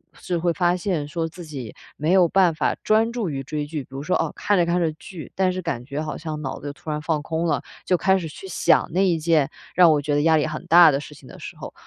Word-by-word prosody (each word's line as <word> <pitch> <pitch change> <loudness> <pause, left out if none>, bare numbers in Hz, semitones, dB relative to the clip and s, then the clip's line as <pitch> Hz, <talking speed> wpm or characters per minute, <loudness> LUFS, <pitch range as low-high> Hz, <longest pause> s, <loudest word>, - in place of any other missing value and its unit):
至 175 -2 -3
会 170 0 0
发 175 0 +2
现 170 -5 -2
说， 165 +2 -2
自 175 +2 -10
己 135 -8 -7 0.2
没 155 +3 0
有 185 -2 +5
办 180 -2 +3
法 - - 0
专 220 +2 +3
注 225 -9 -3
于 135 - -3
追 150 +2 -4
剧， 150 -1 -5
比 - - -13
如 135 +1 -6
说， 180 - 0
哦， - - 0
看 205 0 +1
着 - - +4
看 175 +1 +1
着 165 -2 +1
剧， 160 +1 -10
但 185 -1 +2
是 185 - -4
感 135 -8 -3
觉 145 +2 -5
好 155 - -4
像 155 -1 -5
脑 135 - -4
子 145 0 -6
突 155 +2 -8
然 150 0 -3
放 155 -1 -1
空 165 +2 -2
了， - - 0 0.2
就 180 - +2
开 190 +3 +3
始 165 - -5
去 175 +5 -10
想 185 - +2
那 185 - +2
一 170 -2 +2
件 160 -3 +2 0.2
让 175 -2 +6
我 150 - +3
觉 150 - -1
得 145 - +2
压 160 0 +4
力 150 - +1
很 155 0 -6
大 170 -1 +8
的 140 - 0
事 150 0 -10
情 135 -2 -16
的 - - -12
时 - - -8
候。 - - -9
160 Hz, 305 characters per minute, -23 LUFS, 150-180 Hz, 0.2 s, 大